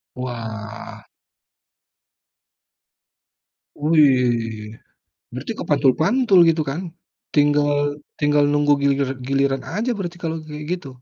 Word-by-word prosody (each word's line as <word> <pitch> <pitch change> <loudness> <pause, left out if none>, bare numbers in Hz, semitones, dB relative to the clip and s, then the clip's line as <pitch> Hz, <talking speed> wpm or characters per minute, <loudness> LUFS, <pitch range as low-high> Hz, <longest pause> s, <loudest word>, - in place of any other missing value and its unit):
Wah. 115 -4 -7 2.7
Wih, 125 -8 +2 0.6
berarti - - -5
kepantul-pantul 190 - +3
gitu 160 -1 +2
kan, 145 +6 -4 0.5
tinggal 145 0 +2 0.2
tinggal 145 0 +3
nunggu 145 0 +2
gilir 140 -1 +1 0.2
giliran 135 -1 +1
aja 235 +4 -1
berarti 175 -2 -5
kalau 160 0 -2
kayak 150 0 -7
gitu. 180 -6 -4
145 Hz, 85 wpm, -21 LUFS, 130-155 Hz, 2.7 s, kepantul-pantul